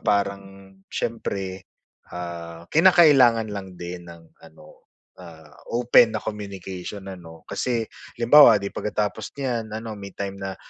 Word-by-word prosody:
parang 100 -1 -2 0.2
siyempre, 95 -5 -4 0.4
ah, 85 -1 -7
kinakailangan 140 - +5
lang 95 -2 -7
din 85 0 -8
ng 85 -1 -14
ano, - - -18 0.3
ah, 80 -4 -14 0.2
open 120 -2 +5
na - - -3
communication 100 -2 -7
ano. 85 -4 -11
Kasi 120 -3 -2 0.3
halimbawa 120 0 +7
'di, 100 -1 -4
pagkatapos 105 0 -3
niyan 120 -5 -3
ano 110 0 -6
may 100 -2 -10
time 100 -1 -5
na 95 -1 -5
100 Hz, 125 wpm, -23 LUFS, 90-115 Hz, 0.4 s, halimbawa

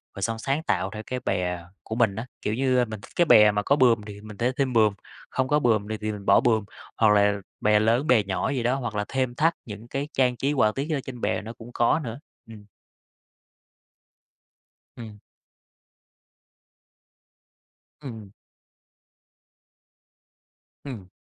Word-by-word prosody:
rồi 100 - -7
xong 115 +2 -2
sáng 140 +6 -1
tạo 95 - 0
theo 110 0 -6
cái 130 0 -4
bè 90 -6 -2 0.2
của 110 - -5
mình 110 -5 +2
á. 115 - -5 0.2
Kiểu 105 - -1
như, 130 +1 +1
ơ, 125 - +3
mình 110 -2 -8
thích - - -14
cái 175 - +4
bè 105 -8 +7
mà 105 0 -1
có 140 - +3
buồm 120 -6 +4
thì 100 0 -9
mình 105 -1 -11
sẽ 125 +2 +1
thêm 135 -3 0
buồm, 110 -3 +4 0.4
không 130 - -1
có 150 +2 +3
buồm 110 -5 +1
này 110 - -3
thì 110 - -2
mình 100 -2 -8
bỏ - - +6
buồm, 110 -4 +2 0.3
hoặc 110 -2 +5
là 105 0 +3 0.2
bè 105 0 +4
lớn 115 +7 +2
bè 115 -5 +4
nhỏ 95 +5 -2
gì 130 -4 -1
đó, 125 +2 +2
hoặc 120 -5 -4
là 105 0 -1
thêm 130 -2 -1
thắt 165 +4 +3
những 110 +1 -9
cái 140 +3 -3
trang 125 -2 +2
trí 140 +2 0
họa 110 -6 +3
tiết 140 +3 -2
gì 160 - -2
đó 140 - 0
trên 125 -3 -8
bè - - 0
nó 115 +2 -8
cũng 115 +1 -12
có 120 +6 +2
nữa, 115 +1 -6 0.3
ừm. 110 -2 -12 2.3
Ừm. 110 -3 -9 2.8
Ừm. 110 -7 -9 2.5
Ừm. 105 -9 -8
115 Hz, 180 wpm, -25 LUFS, 105-130 Hz, 2.8 s, bè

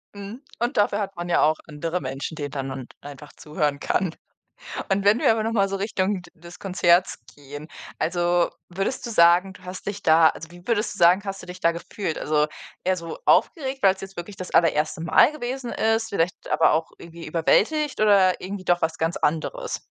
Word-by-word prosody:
Mhm, 200 +5 -8 0.2
und 240 +3 -2
dafür 205 0 +2
hat 195 -1 -4
man 175 0 -5
ja - - +3
auch 155 +1 +3
andere 165 +3 -3
Menschen, 135 +4 -5
denen 145 -2 -4
dann 135 -1 -4
man 130 -2 -6
einfach 145 +1 -11
zuhören 150 -2 -2
kann. 180 +1 -1 0.7
Und 195 0 0
wenn 210 +4 +5
wir - - +4
aber 220 -1 0
noch 225 - -1
mal 200 -3 +2
so 195 - -2
Richtung 195 -1 -1
d 175 - -16
des 170 +2 -13
Konzerts 180 -1 +2 0.2
gehen, 145 +1 -10 0.3
also, 175 0 +1 0.2
würdest 195 +10 -3
du 235 - -5
sagen, 175 0 +5
du 185 - -17
hast 185 0 -8
dich 205 0 -4
da 160 -1 +6
also, 165 - -8
wie 175 +1 -15
würdest 220 -3 0
du - - -12
sagen, 175 +2 +5
hast 195 -1 -5
du - - -9
dich 180 0 -9
da 170 - +3
gefühlt? 170 0 -5
Also, 150 0 +1 0.4
eher 185 0 +1
so 165 -1 -7
aufgeregt, 270 - +2
weil's 190 -1 +4
jetzt 195 0 -10
wirklich 175 +4 -7
das 185 -1 -7
allererste 160 -1 +2
Mal 170 - +5
gewesen 255 -3 -5
ist, 225 0 0
vielleicht 185 -1 -2
aber - - +4
auch 160 +1 0
irgendwie 170 0 -11
überwältigt 230 - +1
oder 195 -3 +4
irgendwie 190 +1 -6
doch 175 0 +2
was 160 0 -1
ganz 165 +1 -1
anderes? 325 - -2
180 Hz, 205 wpm, -24 LUFS, 165-200 Hz, 0.7 s, da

